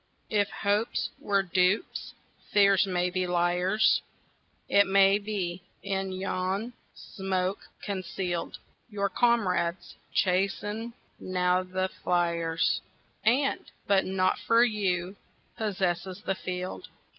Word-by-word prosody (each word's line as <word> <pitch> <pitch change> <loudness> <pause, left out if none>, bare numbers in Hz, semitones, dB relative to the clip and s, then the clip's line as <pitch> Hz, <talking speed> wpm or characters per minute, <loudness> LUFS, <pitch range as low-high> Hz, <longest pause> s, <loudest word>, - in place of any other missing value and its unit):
If 205 -2 +2
hopes 205 +3 0
were 200 -1 +1
dupes, 185 - 0 0.4
fears 200 -1 +5
may 180 -1 0
be 185 0 -1
liars; 180 +4 +2 0.7
It 200 0 +4
may 195 +1 +5
be, 190 -4 -3 0.2
in 195 -1 -2
yon 190 +4 -2 0.2
smoke 190 0 -3
conceal'd, 185 -3 -3 0.3
Your 200 -2 -1
comrades 190 -7 +1 0.2
chase 190 +1 +1
e'en 225 +3 -4 0.3
now 180 0 +1
the 185 0 -2 0.2
fliers, 170 -2 +1 0.4
And, 260 +6 +2 0.2
but 195 -1 +3 0.3
for 230 +1 +4
you, 195 -5 0 0.4
possess 190 -5 -1
the 190 +1 -4
field. 185 - -5
190 Hz, 100 wpm, -28 LUFS, 180-205 Hz, 0.7 s, fears